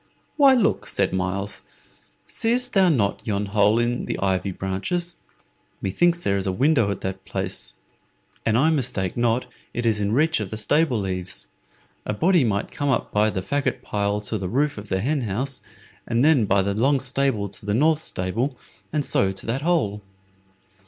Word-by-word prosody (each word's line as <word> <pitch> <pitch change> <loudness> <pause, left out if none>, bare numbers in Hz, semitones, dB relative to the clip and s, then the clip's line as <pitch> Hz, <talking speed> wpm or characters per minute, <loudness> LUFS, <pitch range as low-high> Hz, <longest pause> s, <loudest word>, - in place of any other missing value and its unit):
"Why, 275 -3 +6
look," 235 - +1
said - - 0
Myles; 95 +2 -2 0.6
"seest 245 +2 0
thou 190 -2 +5
not 105 -11 +1
yon 105 -2 -1
hole 105 +2 +3
in 120 +1 0
the - - -3
ivy 95 0 0
branches? 105 - -3 0.6
Methinks 170 - +1
there 100 - +1
is 95 - -2
a - - +1
window 125 +1 +3
at 100 - -3
that 95 0 -4
place. - - -4 0.7
An 110 0 +2
I 155 +6 +4
mistake 120 - -1
not, 120 +1 +1 0.3
it 120 - -2
is 110 -2 +2
in 100 0 0
reach 155 +5 +2
of 105 -3 -4
the 110 - -5
stable 120 -1 +2
eaves. 90 -1 -4 0.6
A 105 - -1
body 175 - +3
might 100 -3 -1
come 145 0 -2
up 130 - 0
by 105 +1 +3
the 95 -3 -3
fagot 130 +3 -1
pile 100 -2 -1
to 105 +1 -3
the 95 -1 -3
roof 140 +1 0
of 105 - -10
the 95 -1 -1
hen 140 +5 0
house, 125 +5 -3 0.5
and 120 +3 +2
then 150 -8 +5
by 100 0 +3
the 100 +1 -1
long 135 +7 +2
stable 130 -5 0
to - - -8
the 105 +1 -1
north 155 +4 +3
stable, 115 +6 -2 0.3
and 150 -2 0
so 95 - +2
to 95 - -6
that 120 +4 -2
hole." 145 - 0
115 Hz, 185 wpm, -23 LUFS, 100-145 Hz, 0.7 s, Why